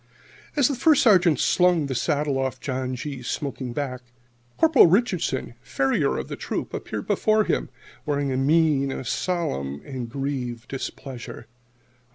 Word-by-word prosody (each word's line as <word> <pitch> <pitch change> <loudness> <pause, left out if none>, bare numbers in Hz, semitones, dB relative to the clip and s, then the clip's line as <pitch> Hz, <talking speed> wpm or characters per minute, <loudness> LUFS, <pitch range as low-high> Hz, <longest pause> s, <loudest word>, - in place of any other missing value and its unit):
As 285 -4 +4
the 285 - -1
First 290 +3 +4
Sergeant 180 - +5
slung 180 -4 +3
the 135 - -3
saddle 145 +1 0
off 130 -1 -2
John 130 -1 -3
G.'s 130 -1 -6
smoking 135 -4 -3
back, 130 -1 -4 0.6
Corporal 320 - +6
Richardson, 180 - 0
farrier 135 +1 0
of - - -4
the - - -5
Troop, - - -4
appeared - - -5
before 215 0 +2
him - - -1 0.3
wearing 145 -2 -1
a 130 - -1
mien 145 -1 +3
of 130 - -5
solemn 70 - -2
and 130 -4 -5
grieved 125 -3 -4
displeasure. 125 -3 -7
140 Hz, 145 wpm, -24 LUFS, 130-170 Hz, 0.6 s, Corporal